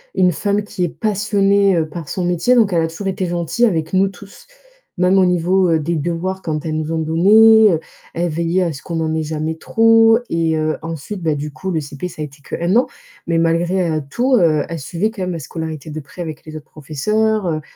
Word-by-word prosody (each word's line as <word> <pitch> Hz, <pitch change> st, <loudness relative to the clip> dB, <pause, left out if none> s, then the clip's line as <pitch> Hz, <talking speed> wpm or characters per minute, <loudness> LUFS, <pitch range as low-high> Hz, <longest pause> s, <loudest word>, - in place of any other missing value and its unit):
une 180 Hz, -2 st, +3 dB
femme 205 Hz, +4 st, -1 dB
qui 205 Hz, -3 st, -4 dB
est 175 Hz, -, 0 dB
passionnée, 200 Hz, -2 st, +1 dB
heu, 160 Hz, -1 st, 0 dB
par 160 Hz, -2 st, -8 dB
son 185 Hz, -, -2 dB
métier, 175 Hz, +8 st, +2 dB
donc 215 Hz, -6 st, +3 dB
elle 165 Hz, -, +2 dB
a 160 Hz, -, 0 dB
toujours 165 Hz, +5 st, -6 dB
été 190 Hz, 0 st, -2 dB
gentille 175 Hz, +5 st, -2 dB
avec 160 Hz, -5 st, -1 dB
nous 190 Hz, +1 st, +3 dB
tous. 200 Hz, +1 st, -15 dB, 0.5 s
Même 185 Hz, +2 st, +4 dB
au 185 Hz, -, +4 dB
niveau, 180 Hz, +1 st, +2 dB
heu, 160 Hz, -1 st, +2 dB
des 165 Hz, +3 st, -2 dB
devoirs 175 Hz, +5 st, -3 dB
quand 155 Hz, -3 st, -4 dB
elles 155 Hz, -1 st, -2 dB
nous 155 Hz, 0 st, -3 dB
en 165 Hz, -, -1 dB
donnait, 205 Hz, +4 st, +5 dB, 0.4 s
elle 175 Hz, +1 st, 0 dB
veillait 170 Hz, +3 st, 0 dB
à 170 Hz, -, -2 dB
ce 140 Hz, -, -10 dB
qu'on 165 Hz, -2 st, -4 dB
en 160 Hz, 0 st, -1 dB
ait 160 Hz, -, 0 dB
jamais 155 Hz, +1 st, -3 dB
trop 225 Hz, +5 st, +4 dB
et 165 Hz, -1 st, 0 dB
heu, 155 Hz, 0 st, 0 dB
ensuite 165 Hz, +4 st, -6 dB
bah 155 Hz, -2 st, +1 dB
du 150 Hz, +1 st, -5 dB
coup 190 Hz, +8 st, -6 dB
le 165 Hz, -, 0 dB
CP 145 Hz, +3 st, -6 dB
ça 155 Hz, -, -9 dB
a -, -, -2 dB
été 145 Hz, 0 st, -14 dB
que -, -, -5 dB
1 175 Hz, +4 st, +1 dB
an, 245 Hz, -, +4 dB, 0.4 s
mais 170 Hz, -1 st, +1 dB
malgré 170 Hz, +2 st, +1 dB, 0.2 s
tout, 255 Hz, +2 st, +1 dB
heu, 160 Hz, -7 st, +3 dB
elle 165 Hz, -1 st, -5 dB
suivait 170 Hz, +9 st, -2 dB
quand 215 Hz, -4 st, -8 dB
même 180 Hz, 0 st, -2 dB
la 165 Hz, -, -4 dB
scolarité 160 Hz, 0 st, -6 dB
de 155 Hz, -, -5 dB
près 140 Hz, +5 st, -11 dB
avec 155 Hz, -2 st, -7 dB
les 155 Hz, 0 st, -9 dB
autres 150 Hz, -, -12 dB
professeurs, 210 Hz, +9 st, -1 dB
heu, 155 Hz, -2 st, -1 dB
170 Hz, 235 wpm, -18 LUFS, 160-195 Hz, 0.5 s, donnait